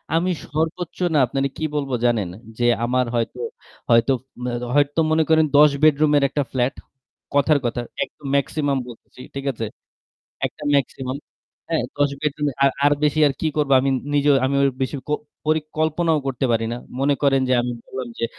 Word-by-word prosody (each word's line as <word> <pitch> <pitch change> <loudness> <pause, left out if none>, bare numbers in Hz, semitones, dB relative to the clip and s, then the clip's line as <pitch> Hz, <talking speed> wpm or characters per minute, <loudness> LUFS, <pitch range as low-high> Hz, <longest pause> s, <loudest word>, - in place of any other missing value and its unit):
আমি 180 +3 +2
সর্বোচ্চ 160 +3 -3 0.2
না - - +3
আপনারে 135 +3 -1
কি 160 - -5
বলবো 140 -3 -1
জানেন? 110 -7 +1 0.3
যে 120 - 0 0.2
আমার 125 +1 +1
হয়তো 115 -1 -2 0.5
হয়তো 115 +2 +5 0.3
মে 125 - -2
দ - - -5
হয়তো 145 +2 +2
মনে 160 0 +4
করেন 160 0 +5
১০ 150 0 +7
বেডরুমের 150 -1 +4
একটা 145 +1 -1
ফ্ল্যাট, 130 0 0 0.6
কথার 145 +1 +4
কথা। 120 +1 -1 0.2
একদম 150 - -12
ম্যাক্সিমাম 140 0 0
বলতেছি, 120 +1 -13
ঠিক 140 - -5
আছে? 115 -2 -4 0.8
একটা - - -11
মেক্সিমাম 130 -1 -2 0.5
হ্যাঁ 165 -5 +1 0.2
১০ 145 -1 +3
বেডরুম 150 0 -1 0.2
আর 140 - +5
আর 145 - +5
বেশি 150 +1 +2
আর - - -1
কি - - 0
করব 150 -2 +1
আমি 135 +1 +1 0.2
নিজেও 145 0 +4
আমি 135 - -1
ওই 140 - +4
বেশি 130 +2 -2
ক - - -5 0.4
পরিকল্পনাও 155 +1 +1
করতে 135 0 -2
পারি 115 0 +1
না। - - -3 0.2
মনে 140 +1 +3
করেন 135 -1 +4
যে - - +2
আমি 125 0 -2
বললাম 130 -2 -6
যে - - 0
140 Hz, 175 wpm, -22 LUFS, 130-155 Hz, 0.8 s, ১০